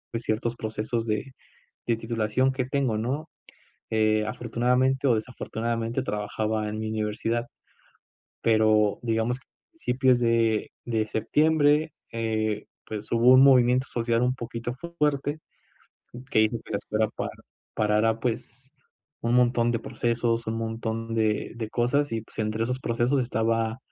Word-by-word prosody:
ciertos 115 0 -1
procesos 110 +1 -3
de 110 +5 -2 0.5
de 115 -1 +2
titulación 115 +2 0
que 130 -1 -1
tengo, 130 -4 0
¿no? 135 +8 -3 0.6
Eh, 110 -1 +2
afortunadamente 125 +4 +1
o 120 - +5
desafortunadamente, 115 +1 -2
trabajaba 105 0 -2
en 110 +1 -4
mi 110 - -3
universidad, 110 +2 -1 1.0
pero 110 -2 +3
digamos 115 +1 0
a - - -26 0.3
principios 130 - +2
de 115 -2 +2
de 110 -2 0
septiembre, 150 +6 +2 0.2
eh, 110 -2 -1 0.2
pues 110 -1 -6
hubo 120 +2 +6
un 130 - +8
movimiento 130 -1 +5
social 115 0 0
un 125 +1 +2
poquito 120 0 -5 0.2
fuerte, 145 0 +1 0.9
que 110 - +5
hizo 110 +2 +2
que - - -11
la 100 - +1
escuela 110 +2 0
para - - -3 0.5
parara, 110 +1 +2
pues, 125 +2 -4 0.5
un 115 +1 +1
montón 120 -1 +3
de 115 - +1
procesos, 115 0 -1
un 110 - -1
montón 115 0 -3
de 110 -1 0
de 115 -2 -4
cosas 125 +6 +1
y, 115 -1 -1
pues, 110 - -13
entre 110 +1 0
esos 125 +2 -2
procesos 120 +3 +1
estaba 115 -1 0
115 Hz, 140 wpm, -26 LUFS, 110-125 Hz, 1.0 s, un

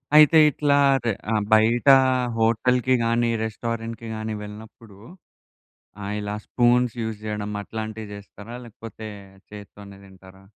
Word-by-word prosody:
అయితే 155 +1 +7
ఇట్లా 145 0 +1 0.3
ర్ - - 0 0.2
అ! - - +1 0.2
బయట 115 +4 +3 0.5
హోటల్‌కి 125 +3 +2
గాని, 115 +1 +1
రెస్టారెంట్‌కి 115 +1 -5
గాని 110 0 -4
వెళ్ళినప్పుడు 105 0 -12 1.1
ఆహ్, 100 +1 -4
ఇలా 105 0 -4
స్పూన్‌స్ 125 0 +2
యూజ్ 110 -1 -5
చేయడం 105 -1 -4
అట్లాంటివి 110 0 -7
చేస్తారా? 100 +2 -11
లేకపోతే 110 -1 -10 0.4
చేత్తోనే 100 -1 -12
తింటారా? 95 0 -17
110 Hz, 115 wpm, -23 LUFS, 105-115 Hz, 1.1 s, అయితే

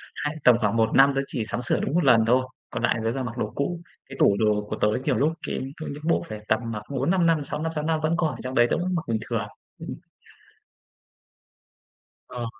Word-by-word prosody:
hay 150 +1 -3
tầm 125 -2 +7
khoảng 110 -1 0
1 110 -1 +3
năm 135 +2 +7
tớ 135 - +2
chỉ 115 -5 -3
sắm 115 +2 -3
sửa 125 - +1
đúng - - -2
1 175 +1 +3
lần 115 -5 +5
thôi, 125 +2 +4 0.3
còn - - -4
lại - - +3
là - - -4
tớ 115 - +2
toàn 130 0 -3
mặc 120 0 -6
đồ 110 -3 -2
cũ. 170 +5 -2 0.3
Cái 135 - -8
tủ 100 - +5
đồ 105 -1 +1
của - - -2
tớ - - +1 0.2
nhiều - - +1
lúc 150 +3 +2 0.2
cái - - -2 0.2
có - - -4
những 145 +2 -8
bộ 165 - +2
phải 110 -1 -6
tầm 110 - +2
mặc 105 -2 -5
4-5 170 +7 +1
năm, 165 -3 +3
6 150 +1 -5
năm 160 0 -1
6 150 - -2
năm 160 0 0
vẫn 155 +2 +1
còn 165 -2 +1
ở - - -6
trong 130 +1 -5
đấy, 120 -1 +5
tớ - - +1
vẫn 180 +2 -1
mặc 165 - -1
bình 115 -1 0
thường. 115 -3 -1 0.3
Ừm. - - -6 2.3
Ờ. 120 -1 -5
130 Hz, 250 wpm, -25 LUFS, 115-155 Hz, 2.3 s, tầm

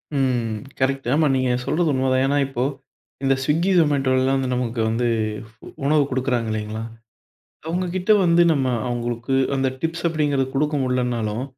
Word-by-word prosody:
ம். 120 -5 0 0.2
கரெக்ட். 135 -1 0
ஆமா 155 +1 +3
நீங்க 130 -1 +1
சொல்றது 165 +1 +1
உண்மதான். 130 0 +1
ஏன்னா 140 +1 +1
இப்போ 125 -2 -2 0.6
இந்த 135 0 +3
Swiggy, 160 +7 +1
Zomatto 145 -5 +2
எல்லாம் 130 +1 +2
வந்து 130 -1 -2
நமக்கு 120 -1 -2
வந்து 120 +2 0 0.8
உணவு 150 +1 +4
குடுக்கறாங்களேங்கல்ல. 115 -4 -2 0.9
அவங்ககிட்ட 180 +4 0
வந்து 170 0 +5
நம்ம 135 -4 +1 0.2
அவங்களுக்கு 120 +1 -2 0.2
அந்த 135 0 +1
டிப்ஸ் 165 +1 -3
அப்படிங்கிறது 145 -4 0
குடுக்க 150 +2 0
முடியலைன்னாலும் 125 -3 -1
135 Hz, 135 wpm, -22 LUFS, 125-150 Hz, 0.9 s, வந்து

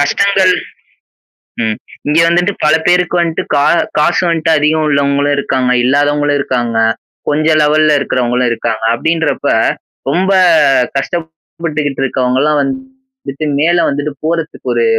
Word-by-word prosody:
கஷ்டங்கள் 190 +5 +2 1.1
ம். 110 -1 -1 0.3
இங்க 150 +2 +1
வந்துட்டு 175 +3 +1
பல 150 - +4
பேருக்கு 180 0 +2
வந்துட்டு 165 -2 -1
கா 145 0 +2 0.3
காசு 150 +3 +2
வந்துட்டு 165 -1 0
அதிகம் 155 +1 +1
உள்ளவங்களும் 140 0 +1
இருக்காங்க. 130 -2 -1
இல்லாதவங்களும் 145 +2 +1
இருக்காங்க. 120 -4 -2 0.5
கொஞ்சம் 155 +1 +2
லெவல்‌ல 155 0 +3
இருக்கறவுங்களும் 125 -2 0
இருக்காங்க. 110 -1 -3
அப்பிடின்றப்ப 160 +5 -1 0.6
ரொம்ப 190 +5 +1 0.6
கஷ்டப்பட்டுக்கிட்டு 160 -2 -4
இருக்கவுங்கலாம் 130 +4 0
வந்துட்டு 265 - -7
மேல 170 +3 +2
வந்துட்டு 145 +1 -3
போறத்துக்கு 165 0 -3
ஒரு 465 - +1
150 Hz, 110 wpm, -13 LUFS, 140-170 Hz, 1.1 s, பல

